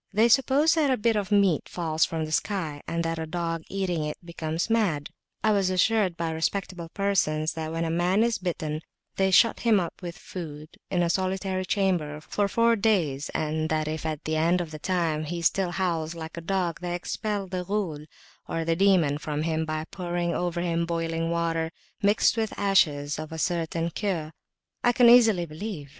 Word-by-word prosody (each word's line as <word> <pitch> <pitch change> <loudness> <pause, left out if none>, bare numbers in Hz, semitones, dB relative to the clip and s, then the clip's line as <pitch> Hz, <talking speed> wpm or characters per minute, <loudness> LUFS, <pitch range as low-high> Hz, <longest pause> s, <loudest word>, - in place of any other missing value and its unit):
They 220 +4 +4
suppose 275 +5 +4
that 310 -4 +2
a 260 - +2
bit 225 +1 +2
of 205 -1 -2
meat 200 -6 +3
falls 160 -2 +1
from 160 -1 -3
the 155 - -7
sky, 160 -5 -1
and 170 0 -1
that 165 0 -2
a 160 - -4
dog 165 0 -2
eating 185 -5 -1
it 150 0 -4
becomes 165 -1 -3
mad. 195 -11 0 0.3
I 215 - +4
was 200 -3 +2
assured 185 -1 +2
by 165 -1 -1
respectable 170 +1 -2
persons, 165 -6 0
that 160 -1 -4
when 165 +1 -1
a 165 - -1
man 180 +5 +2
is 235 -1 +1
bitten, 155 -4 -3 0.4
they 190 0 +3
shut 220 +4 +5
him 225 -4 +4
up 170 0 -5
with 175 -1 -6
food, 155 -4 -8 0.2
in 175 -2 +1
a 170 - +1
solitary 185 0 -1
chamber, 175 -7 0
for 200 +6 -1
four 230 +3 +3
days, 175 -11 +1
and 155 +1 -1
that 155 -1 0
if 155 0 -3
at 155 -2 -3
the 155 0 0
end 170 +3 +3
of 170 -3 -4
that 155 -1 -8
time 165 -4 0
he 170 +3 -4
still 190 +2 +2
howls 170 -3 -1
like 160 -1 -7
a 170 - -6
dog, 175 -1 -1
they 175 -1 -2
expel 205 +3 -3
the 185 -1 -4
Ghul 175 -6 -3 0.7
(demon) 170 -6 +3
from 150 0 -3
him, 160 0 0
by 155 0 -3
pouring 175 -2 -2
over 175 -1 -1
him 170 -1 0
boiling 165 -1 -1
water 165 -1 0 0.3
mixed 205 +2 +3
with 220 -1 -2
ashes 150 -8 +2
a 155 +1 -6
certain 165 0 -1
cure 170 -7 -2 0.5
I 245 - +4
can 240 -1 +7
easily 220 -8 +6
believe. 160 -2 -6
170 Hz, 190 wpm, -26 LUFS, 160-195 Hz, 0.7 s, can